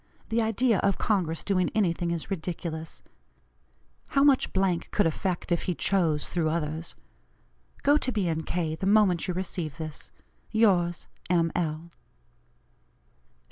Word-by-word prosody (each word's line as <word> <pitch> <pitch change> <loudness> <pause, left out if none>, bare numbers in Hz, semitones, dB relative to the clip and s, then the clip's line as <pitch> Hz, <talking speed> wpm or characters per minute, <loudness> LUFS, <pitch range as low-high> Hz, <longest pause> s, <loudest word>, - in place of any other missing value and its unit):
The 230 +1 +2
idea 225 -1 +2
of 200 -1 +1
Congress 175 -7 0
doing 185 -3 +1
anything 175 -4 +1
is 170 +2 -4
ridiculous. 165 -2 -5 1.1
How 275 - +3
much 280 -2 +4 0.4
could 205 - +2
effect 175 +2 -2
if 170 - +1
he 180 - -1
chose, 165 -7 +1
through 165 -3 0
others. 160 0 -3 0.9
Go 290 +1 +5
to 255 - 0
B. 190 -8 0
& - - -11
K. 165 -3 -1
the 175 +4 -3
moment 200 -5 +4
you 180 - -2
receive 170 -5 -4
this. 155 -2 -6 0.4
"Yours, 185 -6 +2 0.2
M. 165 -2 +2
L." 165 0 -3
175 Hz, 135 wpm, -27 LUFS, 165-200 Hz, 1.1 s, Go